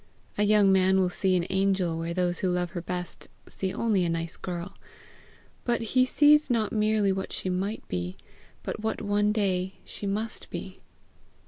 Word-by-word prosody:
A - - -1
young 210 -1 +5
man 190 0 +4
will 180 -1 +2
see 185 0 +1
an 175 -1 +1
angel 190 -3 +1
where 165 +1 -3
those 175 0 0
who 185 - 0
love 180 -1 -1
her 175 - -4
best 180 0 -5 0.2
see 190 -1 -2
only 210 -4 +1
a 170 - 0
nice 165 0 -3
girl; 175 +1 -6 0.9
but 235 -1 0
he 255 0 +5
sees 295 +2 +5
not 225 -4 +1
merely 215 -2 +2
what 190 0 -3
she 185 - -2
might 195 +4 -3
be, 90 0 -4 0.5
but - - -4
what 220 +1 -2
one 205 0 +1
day 190 -3 0
she 205 - -5
must 215 +3 -3
be. - - -7
190 Hz, 180 wpm, -27 LUFS, 180-210 Hz, 0.9 s, young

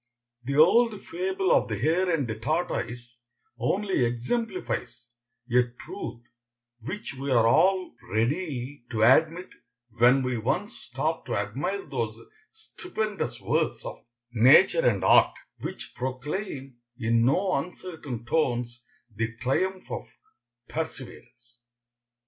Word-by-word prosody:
The 140 +3 -2
old 210 +7 +5
fable 185 +2 -1
of - - +4
the 110 - -2
hare 165 - +2
and 155 -7 +1
the 110 - -2
tortoise 120 -2 -3 0.4
only 195 -7 +1
exemplifies 125 - -2 0.4
a 125 0 +4 0.2
truth 370 - -7 0.6
which 190 - -6
we 135 +1 -5
are 120 -3 +4
all 185 +9 +3 0.2
ready 130 - -1
to 110 -2 0
admit 160 +9 +4 0.4
when 120 +4 +4
we 125 -2 -1
once 185 - -1
stop - - -3
to - - -1
admire 400 -1 -2
those - - -3 0.3
stupendous 215 - -4
works - - 0
of - - -7 0.3
nature 135 - +6
and - - -2
art, - - +5 0.2
which - - -7
proclaim 135 - -4 0.2
in 115 -1 +2
no 185 +10 +2
uncertain 145 -6 -5
tones 120 -4 0 0.3
the 115 +1 -3
triumph 185 +10 -1
of - - -4 0.6
perseverance. 120 -6 -7
135 Hz, 115 wpm, -27 LUFS, 120-185 Hz, 0.6 s, nature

